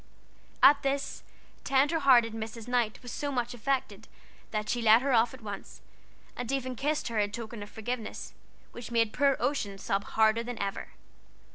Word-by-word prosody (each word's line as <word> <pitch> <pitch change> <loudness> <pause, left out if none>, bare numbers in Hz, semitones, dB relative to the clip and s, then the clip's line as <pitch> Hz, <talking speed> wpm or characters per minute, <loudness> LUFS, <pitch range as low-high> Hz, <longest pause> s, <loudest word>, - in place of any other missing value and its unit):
At 285 0 +8
this, 275 0 -2 0.4
tender 285 +4 +2
hearted 245 -6 +5
Mrs. 225 0 -6
Knight 245 -3 0
was 245 - -7
so 285 -1 -3
much 245 -2 -2
affected 255 +3 -2 0.4
that 215 -1 -3
she 240 - -1
let 225 +2 +6
her 275 -1 +1
off 230 0 +4
at 260 - -12
once, 205 -2 -8 0.6
and 245 0 -4
even 260 -2 -2
kissed 295 +5 -1
her 225 -2 -1
in 205 -1 +1
token 225 0 -7
of 205 - -8
forgiveness, 225 +1 -5 0.4
which 240 -1 -8
made 230 -2 +1
poor 280 -1 +3
Ocean 240 -7 -1
sob 195 +1 -2
harder 220 +1 +3
than 240 0 -6
ever. 200 -1 -3
235 Hz, 170 wpm, -29 LUFS, 220-265 Hz, 0.6 s, At